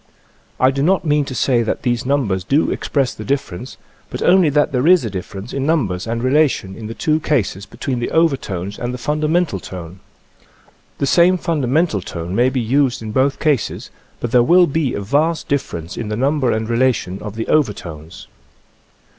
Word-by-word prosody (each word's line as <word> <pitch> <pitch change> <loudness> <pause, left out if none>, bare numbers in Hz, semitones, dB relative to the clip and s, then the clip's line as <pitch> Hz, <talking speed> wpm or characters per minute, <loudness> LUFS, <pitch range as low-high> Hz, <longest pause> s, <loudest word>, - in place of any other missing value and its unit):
I 130 +1 +4
do 135 0 -2
not 180 +4 +2
mean 150 -1 +2
to 130 - -6
say 125 -3 +2
that 110 - -2
these 120 0 -1
numbers 115 -10 0
do 140 - +1
express 135 -4 -1
the - - -8
difference, 130 -3 -4 0.3
but - - -4
only 180 -3 +5
that 145 +1 +2
there 130 +3 +1
is 180 -7 +5
a 110 - -4
difference 95 +3 -7
in 135 - -2
numbers 115 - 0
and 115 +1 -2
relations 130 -8 +1
in 110 -2 -8
the 115 - -7
two 155 0 +1
cases 115 - -1
between 125 +2 -4
the 120 - -2
overtones 105 - 0
and 125 +1 -3
the - - -5
fundamental 150 - 0
tone. 90 0 -9 1.0
The - - 0
same 175 +6 +4
fundamental 150 - 0
tone 85 0 -6
may 120 +5 +3
be 130 0 -2
used 125 +1 +1
in 110 - -5
both 135 +4 +1
cases, 150 -7 -1 0.3
but 120 - -4
there 125 - +5
will 175 +9 +5
be 145 -4 -1
a - - -3
vast 150 +10 0
differ 140 -10 -1
ence 85 +2 -8
in 115 - -4
the 105 - -2
number 135 -1 +1
and 110 0 -1
relation 115 -6 0
of 105 0 -7
the 115 - -4
over 150 -8 +3
tones. 85 +1 -10
130 Hz, 195 wpm, -19 LUFS, 105-150 Hz, 1.0 s, only